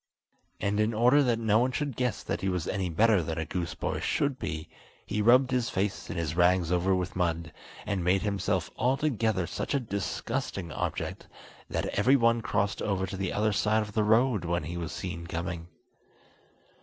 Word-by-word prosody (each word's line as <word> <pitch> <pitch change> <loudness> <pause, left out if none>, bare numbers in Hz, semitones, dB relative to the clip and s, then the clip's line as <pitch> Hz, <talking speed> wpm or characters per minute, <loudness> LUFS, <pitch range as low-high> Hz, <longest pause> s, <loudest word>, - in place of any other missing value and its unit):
And 100 +1 0
in 110 +1 +1
order 125 +6 +5
that 120 -4 +2
no 110 -1 +3
one 125 +2 +2
should 145 -1 -2
guess 125 -1 -1
that - - -3
he 95 - 0
was 90 -3 -2
any 95 -3 -1
better 105 +3 +4
than 80 0 -4
a 80 - -2
goose 85 -1 -3
boy - - -2
should 140 -3 0
be, 80 -6 -4 0.4
he 105 - -1
rubbed 125 +4 +5
his 125 -1 +1
face 100 -2 -2
and - - -4
his 80 -2 -2
rags 90 -1 +3
over 90 +2 +2
with 90 -2 -3
mud, 85 -3 -1 0.3
and 100 -4 -1
made 95 +3 +2
himself 100 -3 -1
altogether 120 - +1
such 140 - -3
a - - +3
disgusting 105 - -3
object - - -4 0.4
that - - -1
every 125 +7 +3
one 115 -2 +3
crossed 100 -2 -1
over 95 -2 0
to 95 +1 -6
the 95 -1 -2
other 105 0 +1
side 110 +2 +2
of 105 -1 -9
the 110 0 +2
road 110 -1 +3
when 85 -1 -1
he 85 +3 -5
was 85 -3 -4
seen 85 +2 -5
coming. 85 0 -4
100 Hz, 195 wpm, -29 LUFS, 85-115 Hz, 0.4 s, order